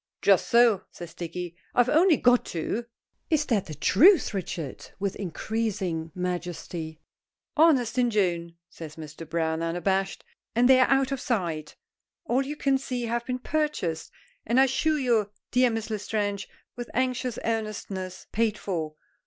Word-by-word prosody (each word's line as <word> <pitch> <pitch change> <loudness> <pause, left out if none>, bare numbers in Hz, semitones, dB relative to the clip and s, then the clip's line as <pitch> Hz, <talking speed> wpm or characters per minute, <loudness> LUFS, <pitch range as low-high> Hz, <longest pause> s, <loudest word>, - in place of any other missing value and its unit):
'" - - -62
"Just 195 -2 +4
so," 235 -4 +5
says 170 -1 -10
Dicky. 175 0 -6 0.2
"I've 245 0 +4
only 325 +3 +5
got 245 0 +4
two." 205 +8 -3 0.4
"Is 310 -3 +2
that 220 -9 0
the 155 - -6
truth, 305 - +5
Richard?" 165 -7 -5
with 200 0 -2
increasing 190 -3 -2
majesty. 175 -3 -4 0.6
"Honest 265 -7 +4
Injun," 180 -8 +1
says 155 -2 -10
Mr. 155 0 -9
Browne, 160 -1 0
unabashed. 190 +3 -1 0.3
"And 245 +1 +5
they 260 0 +7
are 255 - +4
out 270 0 +3
of 270 -2 -2
sight. 170 -10 -2 0.5
All 260 -3 +2
you 280 +2 -4
can 275 -2 +1
see 250 -2 -3
have 235 +1 -2
been 255 -1 -1
purchased, 270 - -2 0.3
and 235 +4 +2
I - - +8
assure 300 +4 +1
you, 235 -7 +2 0.2
dear 250 0 +4
Miss 225 -1 -3
L'Estrange," 205 -1 -2 0.3
with 240 0 -6
anxious 255 -1 0
earnestness, 200 -5 -3
"paid 220 -1 +1
for. 160 -5 -3
215 Hz, 150 wpm, -27 LUFS, 175-250 Hz, 0.6 s, I